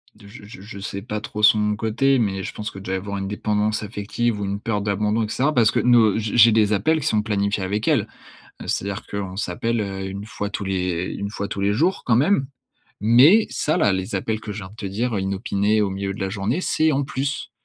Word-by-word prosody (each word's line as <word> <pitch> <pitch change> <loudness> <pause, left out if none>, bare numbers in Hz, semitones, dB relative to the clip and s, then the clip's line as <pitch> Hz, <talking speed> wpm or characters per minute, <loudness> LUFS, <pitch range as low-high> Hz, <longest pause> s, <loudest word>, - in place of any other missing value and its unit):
de 105 -1 -16
je 100 - -13
je 110 +5 -12
je 100 0 -9
sais 100 0 -5
pas 105 -1 -4
trop 105 0 -6
son 105 -1 +4
côté, 115 +6 +2
mais 95 -4 -1
je - - -5
pense 105 0 -5
que 95 - -9
déjà 95 -1 -5
y - - +1
avoir 100 +1 -4
une 95 0 -3
dépendance 105 +1 -1
affective 105 +2 -2
ou - - -1
une 100 +1 -3
peur 105 -1 -2
d'abandon, 105 +2 0
et 105 - -3
cetera, 140 +7 +1
parce 115 -5 +4
que - - +1
nos 115 -4 +4
heu, - - 0
je 110 -1 -3
j'ai 115 -1 +8
des 105 -1 +3
appels 140 +11 +2
qui 145 - -5
sont 110 -8 +2
planifiés 100 -2 -1
avec 105 +4 -2
elle. - - +2 0.6
C'est-à-dire 100 +1 -2
qu'on 100 -2 -5
s'appelle, 110 +5 -1
heu, 95 -2 -4
une 100 +1 -6
fois 105 -1 -4
tous 100 0 -5
les 90 -2 -2
une 100 - -3
fois 100 -1 -4
tous 100 - -4
les 100 +1 +2
jours, 170 - +1
quand 120 - +4
même. 140 +2 +2 0.5
Mais 130 - +6
ça, 155 - 0
là, 105 - +3
les 95 +1 -3
appels 110 +3 -2
que 105 - -6
je 105 - -6
viens 95 -1 -8
de 105 - -16
te 110 - -7
dire, 110 +3 -2
inopinés 100 +2 0
au 100 - +1
milieu 95 0 -3
de - - -9
la 95 -1 -2
journée, 105 - -2
c'est 160 -3 +2
en 140 0 +1
plus. 140 +1 -3
105 Hz, 250 wpm, -22 LUFS, 100-115 Hz, 0.6 s, j'ai